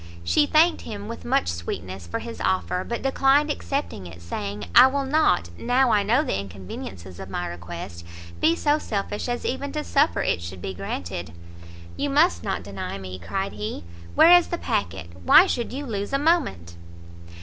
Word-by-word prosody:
She 85 - +3
thanked 325 +2 +4
him, 205 -2 -7
with 230 - -7
much 90 - +1
sweetness, 85 +2 -5
for 85 - -3
his 235 - -7
offer, 185 -1 0
but 235 +3 -4
declined 270 +2 +3
accepting 275 - -3
it, 85 -1 -11
saying 100 +4 -5
"I 250 +2 +9
will 275 +1 -1
not, 270 - +2
now 250 +1 +3
I 205 - +4
know 235 +8 +2
the 265 - -1
inconveniencies 95 -1 -8
of 95 0 -8
my 90 -2 -3
request, 85 0 -7 0.4
be 165 - +4
so 295 - +2
selfish 205 -1 -3
as 240 0 -3
even 275 +2 -2
to 300 -1 -2
suffer 295 +2 +2
it - - 0
should 90 +2 -7
be 95 +2 -5
granted." 85 -3 -5 0.6
"You 285 - -1
must 305 +6 +3
not 195 - -2
deny 100 -1 -5
me," 95 -1 -8
cried 195 - -3
he; 105 -3 -5 0.3
"where 335 - +7
is 350 - +4
the 345 - -3
packet? 205 - -3
why 345 - +8
should 240 -11 -2
you 280 +3 -5
lose 205 -1 -4
a - - +4
moment?" 275 - 0
195 Hz, 180 wpm, -24 LUFS, -, 0.6 s, I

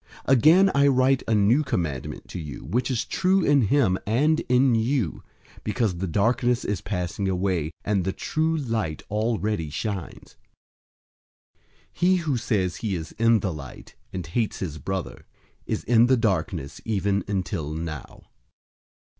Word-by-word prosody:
002:008 135 - +5
Again, 170 +9 +6
I 140 0 +4
write 130 0 +3
a 115 - +2
new 110 +8 +4
commandment 80 - -3
to - - -6
you, 75 -6 -7
which 120 - -1
is 125 -4 -1
true 190 +1 +2
in 140 -6 +4
him 115 -8 +2
and 150 +9 +2
in 125 0 +4
you; 115 - 0 0.4
because 105 -4 -1
the 95 - -2
darkness 120 +6 +1
is 100 -3 -2
passing 95 0 -2
away, 90 -4 0 0.2
and 100 -3 +1
the 95 - -1
true 160 +9 -1
light 110 - -2
already 105 -5 -1
shines. 95 +3 -5 1.2
002:009 - - -60 0.4
He 180 +2 +3
who 155 -6 0
says 105 -7 -1
he 105 -4 -2
is 80 -3 -6
in 115 -2 +4
the 95 -3 -2
light 70 -4 -10 0.2
and 90 -3 -5
hates 105 +7 -1
his 80 -5 -5
brother, 95 +1 -5 0.4
is - - -2
in 120 0 +4
the 130 0 +4
darkness 95 - -1
even 100 -2 0
until 95 -6 -2
now. 80 -3 -6
105 Hz, 155 wpm, -25 LUFS, 90-125 Hz, 1.2 s, Again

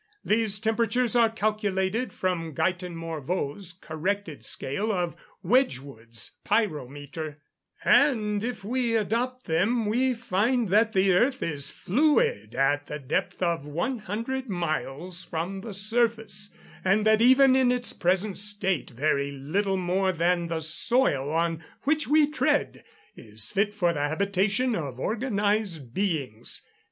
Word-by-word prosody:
These 215 -1 +1
temperatures 230 +2 +1
are 230 -2 +5
calculated 215 +1 -1
from 165 -5 -2
Guyton 180 +1 -1
Morveau's 165 +2 -4
corrected 175 0 -4
scale 170 +12 -2
of 175 -4 -1 0.3
Wedgwood's 135 - -1
pyrometer; 150 - -2 0.5
and 215 -7 +3
if 235 -3 -4
we 235 +1 0
adopt 245 +4 -1
them, 205 +8 +1
we 250 +4 +1
find 230 +1 0
that 215 +3 +3
the 190 0 +4
earth 255 +8 +2
is 145 -4 0
fluid 185 - +1
at 145 +2 +1
the 150 - -4
depth 150 +7 -2
of 170 -4 0
100 230 - -3
miles 175 0 -3
from 175 +3 -4
the 225 - -7
surface, 215 0 0 0.3
and 195 +3 +2
that 220 0 +4
even 260 +2 +6
in 260 -2 +4
its 245 -1 -2
present 185 +3 0
state 200 -5 0
very 140 +2 0
little 190 +9 -1
more 185 +1 +1
than 175 0 +1
the 165 -1 -2
soil 155 - +2
on 165 0 0 0.2
which 305 +2 +1
we 300 +2 +5
tread 300 +1 0 0.3
is 110 -2 -7
fit 205 +1 +1
for 180 -5 +1
the 150 - -3
habitation 200 - +1
of 140 - -4
organised 205 - -1
beings." 140 - -2
195 Hz, 130 wpm, -26 LUFS, 160-225 Hz, 0.5 s, even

